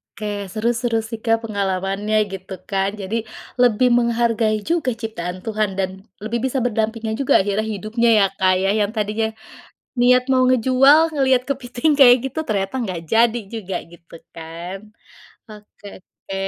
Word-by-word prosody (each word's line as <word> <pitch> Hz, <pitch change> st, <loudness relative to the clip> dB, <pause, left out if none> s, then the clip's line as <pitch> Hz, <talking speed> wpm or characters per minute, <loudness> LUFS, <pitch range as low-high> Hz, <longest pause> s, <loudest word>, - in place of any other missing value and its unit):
Oke, 215 Hz, -, -7 dB, 0.3 s
seru 220 Hz, +3 st, -1 dB
seru, 235 Hz, -1 st, -1 dB
sih, 225 Hz, -, -6 dB
Kak, 225 Hz, 0 st, +1 dB
pengalamannya, 200 Hz, 0 st, -2 dB, 0.2 s
gitu, 190 Hz, 0 st, -8 dB, 0.2 s
kan, 195 Hz, 0 st, 0 dB
jadi 195 Hz, +3 st, -4 dB, 0.5 s
lebih 245 Hz, +1 st, +4 dB
menghargai 230 Hz, -2 st, +1 dB
juga 330 Hz, -6 st, +1 dB
ciptaan 185 Hz, -6 st, -6 dB
Tuhan 215 Hz, -2 st, -1 dB
dan 190 Hz, -1 st, 0 dB, 0.3 s
lebih 230 Hz, +2 st, -2 dB
bisa 265 Hz, +1 st, -2 dB
berdampingan 225 Hz, -1 st, -1 dB
juga 275 Hz, -, +1 dB
akhirnya 205 Hz, +2 st, -1 dB
hidupnya, 220 Hz, +3 st, -1 dB
ya, 200 Hz, -, +5 dB
Kak, 185 Hz, -1 st, +3 dB
ya, 195 Hz, -, +1 dB
yang 205 Hz, 0 st, 0 dB
tadinya 215 Hz, +1 st, -1 dB, 0.7 s
niat 250 Hz, +1 st, +5 dB
mau 255 Hz, -1 st, +3 dB
ngejual, 270 Hz, +6 st, +4 dB
ngelihat 265 Hz, -3 st, +2 dB
kepiting 260 Hz, +1 st, -1 dB
kayak 245 Hz, -3 st, +8 dB
gitu 265 Hz, -, -5 dB
ternyata 195 Hz, +1 st, -1 dB
nggak 185 Hz, -7 st, -4 dB
jadi 235 Hz, +1 st, +4 dB
juga, 200 Hz, -5 st, -4 dB
gitu, 170 Hz, 0 st, -18 dB, 0.2 s
kan. 170 Hz, +3 st, -8 dB, 0.7 s
Oke 210 Hz, -1 st, -15 dB
oke, 195 Hz, +1 st, -12 dB
220 Hz, 150 wpm, -20 LUFS, 195-245 Hz, 0.7 s, kayak